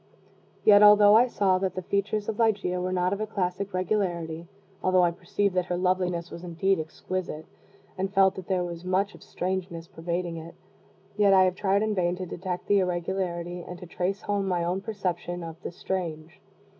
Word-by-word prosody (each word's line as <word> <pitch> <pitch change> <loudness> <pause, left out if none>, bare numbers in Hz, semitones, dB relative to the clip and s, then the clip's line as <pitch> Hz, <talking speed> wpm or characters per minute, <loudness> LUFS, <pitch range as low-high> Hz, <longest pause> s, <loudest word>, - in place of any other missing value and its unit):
Yet, 205 -1 +8
although 210 0 +8
I 240 +3 +6
saw 190 -5 +2
that 190 -1 -2
the 185 - -4
features 205 +3 -1
of 220 0 -3
Ligeia 200 -5 +1
were 185 +1 -2
not 180 +1 +1
of 200 - -3
a 215 - -2
classic 195 -1 -2
regularity 175 -4 -2 0.3
although 185 -1 +3
I 175 - +3
perceived 185 +3 -1
that 180 -1 +1
her 180 - -1
loveliness 180 -2 0
was 170 - -8
indeed 180 +2 0
"exquisite," 160 0 -5 0.5
and 190 +1 -1
felt 195 -1 +4
that 185 - -9
there 185 -2 +1
was 170 -1 -6
much 190 +3 0
of - - -15
"strangeness" 180 -2 -4
pervading 170 +1 -4
it, 165 +1 -9 0.6
yet 200 -2 +5
I 190 - +7
have 185 -1 +2
tried 200 +1 +1
in 215 -1 0
vain 180 -2 +1
to 185 0 -5
detect 180 +1 -5
the 205 -1 +3
irregularity 175 -1 -2
and 180 +1 -8
to 180 - -10
trace 185 +4 -2
home 200 -1 -1
my 175 -2 0
own 180 +3 -1
perception 180 -4 -3
of 165 -1 -8
"the - - -5
strange." 175 -1 -5
185 Hz, 195 wpm, -27 LUFS, 175-195 Hz, 0.6 s, Yet